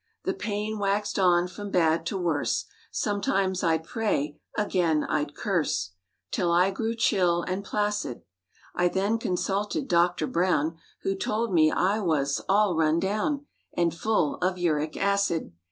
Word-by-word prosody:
The 380 - 0
pain 215 - -3
waxed 205 +1 0
on 175 -1 +4
from 205 +3 -7
bad 165 -3 +2
to 195 - -2
worse; 170 -5 0 0.2
Sometimes 195 -2 0
I'd 160 -2 +2
pray, 155 - -2 0.2
again 175 -7 +1
I'd 145 -1 -2
curse, 150 - -1 0.4
'Till 175 -2 +1
I 180 +3 +4
grew 225 +4 -2
chill 180 -6 +2
and 185 +2 -3
placid. 205 - -2 0.5
I 175 0 +2
then 200 +5 0
consulted 205 +6 -1
Doctor 175 -4 +2
Browm, 165 -2 +1 0.3
Who 195 - +1
told 215 +2 -1
me 155 -2 +5
I 200 +4 +1
was 145 -7 0
"all 200 -2 +3
run 160 0 +2
down" 215 - -1 0.3
And 170 -2 +2
"full 170 -4 0
of 185 +1 0
uric 155 -3 0
acid." 200 - 0
185 Hz, 145 wpm, -27 LUFS, 165-205 Hz, 0.5 s, me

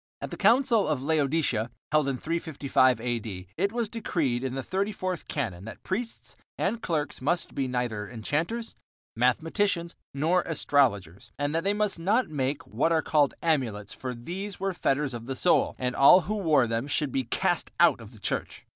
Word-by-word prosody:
At - - -6
the - - -4
Council 230 - +4
of 145 -4 -1
Laodicea, 140 -6 +1 0.2
held 155 -2 +3
in 135 -2 -1
355 140 -6 +1
A.D., 110 -6 -4
it 200 +4 0
was 235 -1 -1
decreed, 160 - -1
in 130 -1 -3
the 135 - -3
thirty 195 - -1
fourth 185 -4 -4
canon, 100 -10 -3
that 115 - -10
priests 225 +5 -4 0.2
and 230 - -1
clerks 155 - -2
must 170 +5 0
be 135 -1 -1
neither 120 -5 -2
enchanters, 160 - -3 0.4
mathematicians, 165 - +1 0.2
nor 160 +6 +2
astrologers, 110 - +1
and 145 +1 -1
that 165 +1 0
they 200 - +1
must 210 -4 0
not 210 +7 +1
make 140 -1 -2
"what 135 +10 0
are 160 -2 +2
called 145 -3 +2
amulets," 120 -11 0
for 125 -1 -5
these 185 - -6
were 195 0 -1
fetters 145 -4 0
of 120 0 -7
the 135 - -3
soul, 175 - +3
and 125 -1 -2
all 160 +7 +8
who 195 +6 -3
wore 160 - +3
them 115 +3 -2
should 145 -1 0
be 130 0 -1
cast 175 +8 0
out 165 -8 +5
of 110 -1 -11
the 110 - -15
church. - - -3
145 Hz, 180 wpm, -27 LUFS, 125-180 Hz, 0.4 s, all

